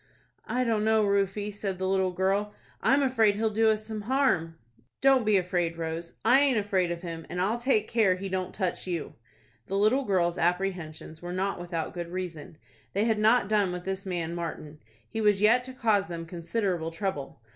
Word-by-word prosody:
"I 255 Hz, +1 st, 0 dB
don't 225 Hz, -3 st, +1 dB
know, 220 Hz, -1 st, +3 dB
Rufie," 200 Hz, +1 st, 0 dB
said 200 Hz, -2 st, -3 dB
the 190 Hz, +1 st, -2 dB
little 190 Hz, -1 st, +2 dB
girl; 195 Hz, +3 st, 0 dB, 0.3 s
"I'm 280 Hz, +1 st, +3 dB
afraid 225 Hz, -6 st, +3 dB
he'll 220 Hz, +1 st, 0 dB
do 220 Hz, +1 st, +3 dB
us 215 Hz, 0 st, 0 dB
some 215 Hz, -1 st, -5 dB
harm." 205 Hz, -, +1 dB, 0.4 s
"Don't 265 Hz, -4 st, +4 dB
be 210 Hz, -2 st, +5 dB
afraid, 175 Hz, -2 st, -1 dB
Rose; 165 Hz, +1 st, -4 dB
I 250 Hz, +4 st, +6 dB
aint 275 Hz, -4 st, +3 dB
afraid 195 Hz, -4 st, +1 dB
of 170 Hz, +1 st, -5 dB
him, 165 Hz, -2 st, -6 dB
and 180 Hz, -, -4 dB
I'll 210 Hz, +6 st, 0 dB
take 240 Hz, -4 st, +2 dB
care 215 Hz, -6 st, +3 dB
he 195 Hz, +2 st, -5 dB
don't 185 Hz, -1 st, -2 dB
touch 185 Hz, -2 st, -2 dB
you." 170 Hz, -4 st, -3 dB, 0.5 s
The 195 Hz, -, -1 dB
little 220 Hz, +7 st, +3 dB
girl's 180 Hz, -5 st, +1 dB
apprehensions 175 Hz, -3 st, -2 dB
were 175 Hz, 0 st, -6 dB
not 195 Hz, +1 st, -1 dB
without 170 Hz, -2 st, -4 dB
good 175 Hz, -1 st, -5 dB
reason. 170 Hz, -4 st, -6 dB, 0.4 s
They 205 Hz, +3 st, +1 dB
had 220 Hz, -2 st, +1 dB
not 220 Hz, 0 st, +4 dB
done 205 Hz, -3 st, +2 dB
with 180 Hz, 0 st, -6 dB
this 190 Hz, 0 st, -3 dB
man 175 Hz, -3 st, -3 dB
Martin. 160 Hz, -3 st, -6 dB, 0.3 s
He 220 Hz, -, -4 dB
was 210 Hz, -2 st, +3 dB
yet 230 Hz, +4 st, +4 dB
to 260 Hz, -, -8 dB
cause 215 Hz, -5 st, +2 dB
them 170 Hz, -2 st, -5 dB
considerable 170 Hz, 0 st, -2 dB
trouble. 165 Hz, -, -4 dB
195 Hz, 195 wpm, -28 LUFS, 175-215 Hz, 0.5 s, I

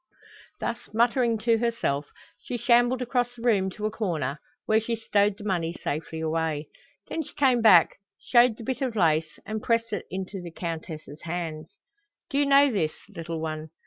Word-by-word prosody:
Thus 235 Hz, 0 st, -2 dB, 0.2 s
muttering 235 Hz, 0 st, +3 dB
to 230 Hz, -1 st, +4 dB
herself, 185 Hz, -12 st, -1 dB, 0.3 s
she 245 Hz, -, -4 dB
shambled 245 Hz, +2 st, +3 dB
across 245 Hz, 0 st, -1 dB
the 235 Hz, -, -11 dB
room 200 Hz, -6 st, +3 dB
to 210 Hz, +3 st, -6 dB
a 215 Hz, -, 0 dB
corner, 160 Hz, -, -2 dB, 0.3 s
where 220 Hz, 0 st, +3 dB
she 230 Hz, +1 st, -2 dB
stowed 205 Hz, -2 st, +1 dB
the 210 Hz, -, -10 dB
money 175 Hz, -5 st, -1 dB
safely 160 Hz, 0 st, -4 dB
away. 160 Hz, -2 st, -1 dB, 0.4 s
Then 325 Hz, -, -2 dB
she 310 Hz, -, -11 dB
came 260 Hz, -4 st, +3 dB
back, 180 Hz, -7 st, +6 dB, 0.2 s
showed 240 Hz, -2 st, +4 dB
the -, -, -9 dB
bit 260 Hz, +3 st, -3 dB
of 255 Hz, -4 st, -1 dB
lace, 160 Hz, -4 st, +2 dB
and 215 Hz, 0 st, -4 dB
pressed 230 Hz, 0 st, 0 dB
it -, -, -4 dB
into 190 Hz, +1 st, -5 dB
the 175 Hz, -, -7 dB
Countess's 160 Hz, -3 st, -6 dB
hands. 160 Hz, -2 st, -4 dB, 0.6 s
"Do 280 Hz, -, +1 dB
you 290 Hz, -, +3 dB
know 280 Hz, 0 st, +6 dB
this, 160 Hz, -8 st, 0 dB, 0.2 s
little 165 Hz, -4 st, -5 dB
one? 155 Hz, 0 st, -4 dB
205 Hz, 175 wpm, -26 LUFS, 160-235 Hz, 0.6 s, back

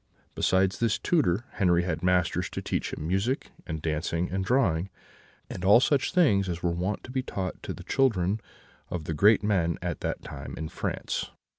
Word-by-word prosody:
Besides 95 Hz, 0 st, +2 dB
this 115 Hz, -2 st, +2 dB
tutor, 120 Hz, -, +1 dB
Henri 90 Hz, -3 st, +4 dB
had 80 Hz, -3 st, -2 dB
masters 90 Hz, -1 st, +1 dB
to -, -, -3 dB
teach -, -, -2 dB
him 75 Hz, -, -5 dB
music 100 Hz, +9 st, -1 dB, 0.2 s
and 80 Hz, -3 st, -4 dB
dancing 80 Hz, +2 st, -1 dB
and 95 Hz, +1 st, -1 dB
drawing, 95 Hz, -6 st, +2 dB, 0.6 s
and 90 Hz, -, -7 dB
all 100 Hz, +5 st, +7 dB
such 135 Hz, +1 st, +2 dB
things 100 Hz, -, +3 dB
as 85 Hz, -1 st, -4 dB
were 85 Hz, -, +2 dB
wont 90 Hz, +4 st, -2 dB
to 125 Hz, -, -9 dB
be 130 Hz, 0 st, 0 dB
taught 95 Hz, -7 st, -4 dB
to -, -, -5 dB
the -, -, -8 dB
children 105 Hz, -6 st, +1 dB, 0.5 s
of 90 Hz, -3 st, -3 dB
the 80 Hz, -, -3 dB
great 105 Hz, +7 st, +5 dB
men 90 Hz, -5 st, +1 dB
at -, -, -3 dB
that -, -, -3 dB
time -, -, -7 dB
in 80 Hz, 0 st, -4 dB
France. -, -, -3 dB
95 Hz, 185 wpm, -27 LUFS, 85-105 Hz, 0.6 s, all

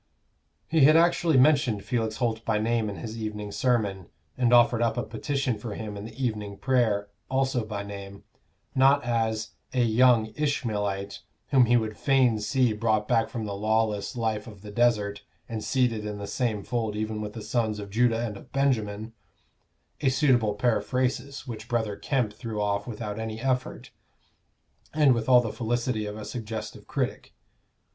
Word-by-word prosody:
He 160 Hz, -, +1 dB
had 155 Hz, +2 st, +7 dB
actually 170 Hz, -2 st, +3 dB
mentioned 130 Hz, -6 st, +3 dB
Felix 115 Hz, -3 st, -1 dB
Holt 115 Hz, -2 st, -1 dB
by 110 Hz, -2 st, +1 dB
name 110 Hz, 0 st, 0 dB
in 100 Hz, -, -5 dB
his 115 Hz, +1 st, -6 dB
evening 105 Hz, -1 st, -4 dB
sermon, 100 Hz, -5 st, 0 dB, 0.3 s
and 125 Hz, -2 st, +2 dB
offered 120 Hz, -1 st, +5 dB
up 115 Hz, -1 st, +1 dB
a -, -, 0 dB
petition 125 Hz, +1 st, -2 dB
for 105 Hz, -2 st, -6 dB
him 105 Hz, -2 st, -6 dB
in 100 Hz, +1 st, -7 dB
the 115 Hz, +4 st, -7 dB
evening 105 Hz, -3 st, -3 dB
prayer, 110 Hz, -6 st, +1 dB, 0.2 s
also 130 Hz, -2 st, +1 dB
by 105 Hz, -2 st, -5 dB
name 100 Hz, -1 st, -9 dB, 0.5 s
not 135 Hz, +1 st, +4 dB
as 115 Hz, -2 st, -1 dB, 0.2 s
"a 125 Hz, -, +3 dB
young 115 Hz, -1 st, +4 dB
Ishmaelite, 105 Hz, -9 st, -2 dB, 0.3 s
whom 130 Hz, -3 st, +6 dB
he 120 Hz, +1 st, +5 dB
would 110 Hz, -2 st, -2 dB
fain 130 Hz, -5 st, +3 dB
see 110 Hz, +3 st, +1 dB
brought 110 Hz, -1 st, 0 dB
back 115 Hz, -2 st, +2 dB
from 115 Hz, -2 st, -4 dB
the 100 Hz, -, -4 dB
lawless 110 Hz, +1 st, 0 dB
life 110 Hz, -2 st, -2 dB
of 105 Hz, -3 st, -12 dB
the 105 Hz, -, -8 dB
desert, 105 Hz, -3 st, +1 dB, 0.3 s
and 110 Hz, -2 st, -5 dB
seated 120 Hz, -5 st, +1 dB
in 105 Hz, -1 st, -4 dB
the 100 Hz, -, -5 dB
same 110 Hz, -2 st, -1 dB
fold 115 Hz, -4 st, -2 dB
even 110 Hz, 0 st, -3 dB
with 105 Hz, 0 st, -5 dB
the 110 Hz, -, -7 dB
sons 110 Hz, -3 st, 0 dB
of 100 Hz, -1 st, -7 dB
Judah 115 Hz, +1 st, +2 dB
and 105 Hz, -3 st, -5 dB
of -, -, -15 dB
Benjamin," 115 Hz, -5 st, 0 dB, 0.9 s
a 140 Hz, -, +3 dB
suitable 130 Hz, -6 st, +2 dB
periphrasis 125 Hz, +4 st, -1 dB
which 115 Hz, -4 st, -7 dB
Brother 110 Hz, -4 st, 0 dB
Kemp 120 Hz, -3 st, -1 dB
threw 110 Hz, -1 st, -5 dB
off 100 Hz, 0 st, -1 dB
without 110 Hz, -2 st, -5 dB
any 110 Hz, 0 st, -4 dB
effort, 130 Hz, 0 st, -2 dB, 1.0 s
and 150 Hz, -4 st, +5 dB
with 115 Hz, 0 st, -2 dB
all 125 Hz, -1 st, +7 dB
the 115 Hz, -3 st, -4 dB
felicity 120 Hz, -2 st, -1 dB
of 105 Hz, +1 st, -6 dB
a 105 Hz, -, -7 dB
suggestive 110 Hz, -2 st, -6 dB
critic. -, -, -3 dB
110 Hz, 170 wpm, -27 LUFS, 105-125 Hz, 1.0 s, had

